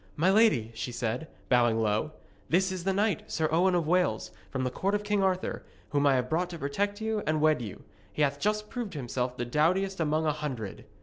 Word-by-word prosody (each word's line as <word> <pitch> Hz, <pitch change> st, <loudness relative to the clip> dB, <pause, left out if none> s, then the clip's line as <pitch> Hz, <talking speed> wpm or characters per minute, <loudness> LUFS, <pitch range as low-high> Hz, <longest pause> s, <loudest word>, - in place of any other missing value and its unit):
'My 175 Hz, +5 st, +3 dB
lady,' 195 Hz, -, +4 dB
she 125 Hz, -, -4 dB
said, 120 Hz, +6 st, -2 dB, 0.2 s
bowing 120 Hz, -3 st, +3 dB
low, 110 Hz, +8 st, 0 dB, 0.4 s
'this 185 Hz, +3 st, +3 dB
is 185 Hz, -2 st, -4 dB
the 195 Hz, -, +2 dB
knight, 200 Hz, -2 st, 0 dB
Sir 160 Hz, -1 st, +1 dB
Owen 180 Hz, +3 st, +3 dB
of 170 Hz, -2 st, +1 dB
Wales, 180 Hz, +3 st, +1 dB, 0.2 s
from 130 Hz, -1 st, -2 dB
the 125 Hz, -, -1 dB
court 195 Hz, +9 st, 0 dB
of 205 Hz, -, -1 dB
King 205 Hz, -1 st, +1 dB
Arthur, 185 Hz, -1 st, 0 dB, 0.3 s
whom 145 Hz, 0 st, +2 dB
I 135 Hz, -, +5 dB
have 125 Hz, -1 st, 0 dB
brought 175 Hz, +5 st, 0 dB
to 170 Hz, -, -6 dB
protect 200 Hz, +9 st, -2 dB
you 220 Hz, -1 st, -1 dB
and 155 Hz, 0 st, +2 dB
wed 155 Hz, -3 st, +3 dB
you. 105 Hz, -5 st, -7 dB, 0.3 s
He 150 Hz, -, 0 dB
hath 140 Hz, 0 st, 0 dB
just 210 Hz, +3 st, 0 dB
proved 225 Hz, -6 st, -5 dB
himself 125 Hz, -2 st, -3 dB
the 120 Hz, -, -2 dB
doughtiest 180 Hz, +9 st, +1 dB
among 155 Hz, 0 st, +1 dB
a 155 Hz, -, +3 dB
hundred.' 135 Hz, -9 st, -5 dB
155 Hz, 220 wpm, -29 LUFS, 130-190 Hz, 0.4 s, I